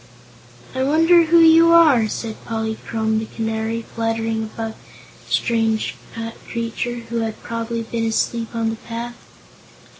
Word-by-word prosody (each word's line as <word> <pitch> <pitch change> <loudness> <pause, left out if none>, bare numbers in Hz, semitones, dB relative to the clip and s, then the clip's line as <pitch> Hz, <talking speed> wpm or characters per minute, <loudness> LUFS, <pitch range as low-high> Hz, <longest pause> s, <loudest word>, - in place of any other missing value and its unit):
"I 260 - -2
wonder 330 +4 +5
who 335 +1 +5
you 330 +1 +7
are?" 295 -10 +6
said 220 +1 -5
Polychrome 220 -1 -2
the 220 - -5
Canary, 225 +1 -3
fluttering 225 0 -2
above 220 0 -5 0.5
the - - -15
strange 225 -2 +1 0.5
creature, 235 +1 -3
who 235 - -2
had 225 -1 -3
probably 230 0 -3
been 225 0 -2
asleep 230 +1 -1
on 225 -1 0
the 225 - -5
path. 235 +1 -6
230 Hz, 130 wpm, -21 LUFS, 225-240 Hz, 0.5 s, you